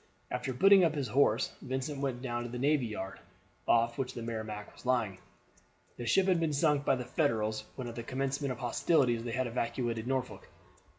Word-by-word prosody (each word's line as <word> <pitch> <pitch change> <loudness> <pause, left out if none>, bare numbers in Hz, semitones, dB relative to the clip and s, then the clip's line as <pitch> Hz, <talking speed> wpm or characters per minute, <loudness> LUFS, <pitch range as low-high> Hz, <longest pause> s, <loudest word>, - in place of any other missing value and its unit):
After 130 - -2
putting 195 +9 +6
up 160 -2 +2
his 140 -5 -2
horse 120 -2 +3
Vincent 135 +2 -3
went 130 -2 -2
down 120 -2 -2
to 120 - -5
the 125 - -5
navy 140 -1 +2
yard, 100 -3 -6 0.5
off 115 +1 +3
which 130 -1 -2
the 120 - -5
Merrimac 110 -2 -5
was - - -16
lying. 120 -7 0 0.8
This 120 -1 -4
ship 195 - +4
had 185 -3 +3
been 160 -2 0
sunk 145 -1 +2
by 135 - +3
the 125 -1 -5
Federals 110 -6 0
when 130 -2 -5
at 120 - -6
the 115 - -5
commencement 135 +3 -2
of 125 - -4
hostilities 120 -1 +2
they 120 - -4
had 130 +3 0
evacuated 120 -1 -2
Norfolk. 130 -1 -3
125 Hz, 195 wpm, -31 LUFS, 115-140 Hz, 0.8 s, putting